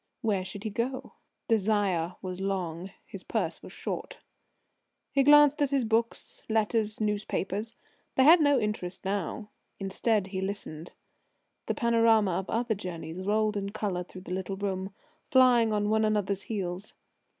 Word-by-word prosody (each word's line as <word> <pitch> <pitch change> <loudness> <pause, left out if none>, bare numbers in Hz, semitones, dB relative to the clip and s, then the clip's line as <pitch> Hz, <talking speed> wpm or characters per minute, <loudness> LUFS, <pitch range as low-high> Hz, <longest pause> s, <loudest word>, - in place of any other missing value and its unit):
Where 205 -4 +1
should 200 +2 -7
he 215 - -3
go? 255 +4 -3 0.3
Desire 200 -6 +1
was 185 0 -5
long; 185 -2 -3 0.2
his - - -9
purse - - -2
was - - -11
short. - - -5 0.9
He 275 - +3
glanced 295 +1 +6
at 285 - +3
his 270 -3 +1
books, 225 +1 -1
letters, 220 -1 +1
newspapers. 210 0 -1 0.4
They 260 - +5
had 320 +4 +8
no 285 -2 +4
interest 200 -4 -3
now. 200 +2 -3 0.3
Instead 200 +1 0
he 190 -1 -3
listened. 190 -5 -5 0.7
The - - -1
panorama 230 -3 +3
of 180 +2 -3
other 235 0 0
journeys 175 -4 -6
rolled 215 +2 +1
in 200 -1 -2
colour 195 -4 -2
through 185 +1 -11
the 180 -1 -6
little 190 +1 -3
room, 190 -1 -3 0.4
flying 250 -5 +5
on 205 -1 +1
one 220 +1 +2
another's 205 -2 0
heels. 195 -2 -5
210 Hz, 150 wpm, -28 LUFS, 190-225 Hz, 0.9 s, had